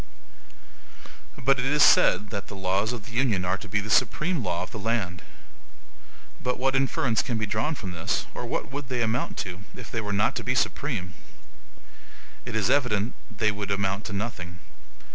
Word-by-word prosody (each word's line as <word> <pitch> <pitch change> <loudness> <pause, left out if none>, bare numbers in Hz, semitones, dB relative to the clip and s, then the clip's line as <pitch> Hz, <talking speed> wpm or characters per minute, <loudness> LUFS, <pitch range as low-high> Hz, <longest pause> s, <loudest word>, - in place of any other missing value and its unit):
But 135 0 +3
it 125 - 0
is 150 +1 +5
said 105 +3 +5
that 100 -2 -4
the 100 - -8
laws 95 +3 +1
of 115 -4 -5
the - - -10
Union 110 -6 +1
are 90 +1 +2
to 105 - -9
be 105 - +1
the 105 +1 -4
SUPREME 150 +6 +2
LAW 90 -2 -1
of - - -8
the 110 - -6
land. 100 -6 -1 1.2
But 125 - 0
what 135 +1 +1
inference 135 -4 +2
can 120 -4 -2
be 110 - 0
drawn 110 +9 0
from 95 -8 -6
this, 85 -2 -1
or - - -4
what - - -3
would 140 -1 -5
they 125 -2 +1
amount 115 +2 -1
to, 90 -1 -6 0.2
if 110 -6 -9
they 115 - -1
were 105 -1 -3
not 100 0 +2
to - - -3
be - - 0
supreme? 90 0 -1 1.3
It 120 -2 -4
is 110 +3 +2
evident 120 -5 +2 0.2
they 110 -1 +1
would 100 -1 -4
amount 100 +1 0
to 105 - -5
nothing. 95 -5 -4
110 Hz, 190 wpm, -27 LUFS, 100-125 Hz, 1.3 s, is